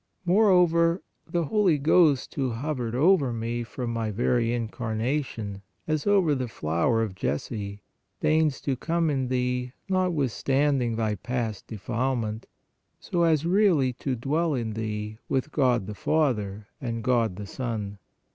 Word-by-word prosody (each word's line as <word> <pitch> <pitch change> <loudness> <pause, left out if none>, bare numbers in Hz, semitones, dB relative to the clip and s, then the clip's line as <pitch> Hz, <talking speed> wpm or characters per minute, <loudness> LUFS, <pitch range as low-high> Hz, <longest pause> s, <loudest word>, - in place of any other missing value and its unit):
Moreover, 180 -3 +4 0.3
the 170 0 0
Holy 180 0 +2
Ghost 150 -1 +3
who 135 -2 -1
hovered 125 -2 -3
over 145 -2 +4
Me 115 +1 -2
from 120 +1 -4
My 115 -1 -1
very 115 +2 +1
Incarnation, 115 -2 -2 0.3
as 155 +3 -1
over 190 -7 +4
the 130 -3 -1
flower 85 +3 0
of 105 -4 -3
Jesse, 100 - -4 0.4
deigns 155 -2 +2
to 135 - -1
come 165 +4 0
in 135 -2 0
thee, 125 0 -1
notwithstanding 140 - +1
thy 110 -1 0
past 115 -2 -3
defilement, 115 0 -2 0.5
so 175 - -2
as 160 -2 +3
really 175 -9 +3
to 130 +2 -3
dwell 150 +6 0
in 115 -3 -2
thee 105 0 -4
with 135 +3 0
God 125 -8 +2
the 105 - -6
Father 105 -7 0 0.2
and 115 -3 -3
God 115 -5 +2
the 105 +2 -6
Son." 105 -3 -4
125 Hz, 135 wpm, -26 LUFS, 110-155 Hz, 0.5 s, Moreover